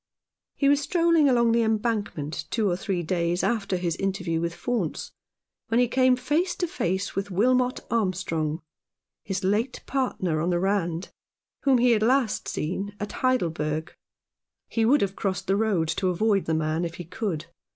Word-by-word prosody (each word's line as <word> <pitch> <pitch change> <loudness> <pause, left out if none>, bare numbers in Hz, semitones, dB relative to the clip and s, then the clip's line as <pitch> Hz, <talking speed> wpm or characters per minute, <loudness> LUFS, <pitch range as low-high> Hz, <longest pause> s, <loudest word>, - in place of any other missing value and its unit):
He 280 - +1
was 285 +1 +4
strolling 335 -2 +3
along 235 -2 +4
the 230 0 +3
Embankment 210 -9 -1
two 220 -3 +1
or 175 - +1
three 190 -2 -2
days 170 +1 0
after 210 -5 0
his 175 -2 -1
interview 185 -4 -1
with 170 0 -1
Faunce, 215 -3 -2 0.6
when 230 +1 +2
he 245 - +4
came 255 +1 +4
face 300 +9 0
to 355 - -1
face 190 - -2
with 195 +1 -2
Wilmot 250 +6 +2
Armstrong, 175 -7 -1 0.6
his 195 -1 -3
late 215 +7 0
partner 185 - -1
on 170 - 0
the 175 -1 +1
Rand, 185 -2 -1 0.5
whom 270 -2 +5
he 245 0 +4
had 220 -2 +3
last 245 -1 +2
seen 195 +6 -3
at 205 - -4
Heidelberg. 160 -11 -1 0.7
He 225 -1 0
would 280 +6 +4
have 195 -1 -1
crossed 190 -2 -2
the 195 - +2
road 200 -6 +1
to 185 +3 0
avoid 200 +2 +1
the 160 - 0
man 160 +1 0
if 170 0 -4
he 175 - -6
could. 170 -2 -3
200 Hz, 170 wpm, -26 LUFS, 175-240 Hz, 0.7 s, whom